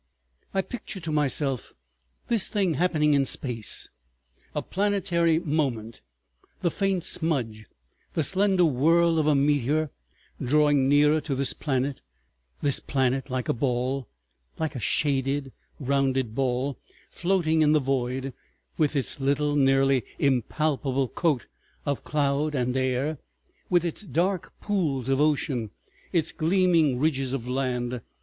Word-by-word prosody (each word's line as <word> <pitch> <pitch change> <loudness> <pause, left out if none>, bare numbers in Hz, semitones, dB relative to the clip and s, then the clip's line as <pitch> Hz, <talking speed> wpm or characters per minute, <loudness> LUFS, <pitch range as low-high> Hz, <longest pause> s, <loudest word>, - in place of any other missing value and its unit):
I 195 - 0
picture 210 -3 -7
to 160 -2 -5
myself 140 -3 0 0.5
this 230 -5 +3
thing 195 -5 +1
happening 155 -2 +2
in 140 -1 +4
space, 125 -4 -1 0.7
a - - -1
planetary 180 -5 +1
moment, 135 -9 -2 0.6
the 170 - +1
faint 195 -2 0
smudge, 120 - -1 0.5
the 160 - +2
slender 190 +1 +3
whirl 165 +4 +3
of 150 -2 +3
meteor, 145 +1 +1 0.5
drawing 145 0 +3
nearer 150 +2 +4
to 145 -3 -3
this 135 0 0
planet,—this 65 - -3
planet 135 0 0
like 130 -1 -2
a - - +2
ball, 125 0 -1 0.5
like 160 -3 -2
a - - -3
shaded 135 +1 0 0.3
rounded 135 -3 0
ball, 130 +2 -1 0.3
floating 170 -3 +1
in 150 0 +4
the 155 - +5
void, 130 -1 -2 0.5
with 150 -1 +2
its 135 0 -2
little, 145 +2 +1
nearly 135 -2 +3
impalpable 135 0 0
coat 155 -8 0 0.4
of 140 -2 -2
cloud 145 0 0
and 125 -1 0
air, 130 +3 0 0.5
with 175 -1 +3
its 170 - -3
dark 185 -1 -1
pools 150 - -1
of 135 +1 +2
ocean, 145 -6 +1 0.4
its 165 -1 +1
gleaming 165 -5 +2
ridges 135 -2 0
of 125 -3 -3
land. 125 -2 -2
140 Hz, 125 wpm, -26 LUFS, 130-160 Hz, 0.7 s, the